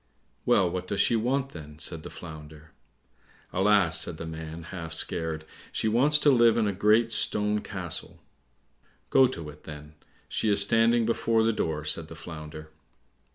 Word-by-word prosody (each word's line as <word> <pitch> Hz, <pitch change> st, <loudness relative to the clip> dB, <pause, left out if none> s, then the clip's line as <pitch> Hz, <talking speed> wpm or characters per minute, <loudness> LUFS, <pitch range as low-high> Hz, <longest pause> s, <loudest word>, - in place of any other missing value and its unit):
"Well, 95 Hz, -, +4 dB
what 90 Hz, +1 st, -4 dB
does 100 Hz, -, -2 dB
she 120 Hz, -, +3 dB
want, 130 Hz, +4 st, 0 dB
then?" 75 Hz, -, -11 dB
said 80 Hz, 0 st, -2 dB
the -, -, -9 dB
Flounder. 80 Hz, -1 st, -11 dB, 0.8 s
"Alas," 95 Hz, -4 st, +3 dB
said 80 Hz, -, -5 dB
the 80 Hz, -, -6 dB
man, 80 Hz, 0 st, -7 dB
half 85 Hz, -1 st, -7 dB
scared, 80 Hz, -1 st, -2 dB, 0.3 s
"she -, -, -1 dB
wants 135 Hz, +7 st, +4 dB
to 145 Hz, -, +6 dB
live 120 Hz, -3 st, +5 dB
in 115 Hz, -, +2 dB
a 100 Hz, -, 0 dB
great 110 Hz, +4 st, +3 dB
stone 105 Hz, -1 st, +2 dB
castle." 90 Hz, -5 st, -4 dB, 0.9 s
"Go 135 Hz, -1 st, +6 dB
to 85 Hz, -11 st, -7 dB
it, 75 Hz, -, -19 dB
then, 75 Hz, 0 st, -10 dB, 0.3 s
she 110 Hz, -, -1 dB
is 100 Hz, -1 st, +3 dB
standing 115 Hz, +3 st, +3 dB
before 115 Hz, 0 st, +1 dB
the 115 Hz, 0 st, +2 dB
door," 80 Hz, -6 st, -2 dB
said 80 Hz, +1 st, 0 dB
the 80 Hz, -, -10 dB
Flounder. 75 Hz, -1 st, -9 dB
90 Hz, 165 wpm, -27 LUFS, 80-115 Hz, 0.9 s, to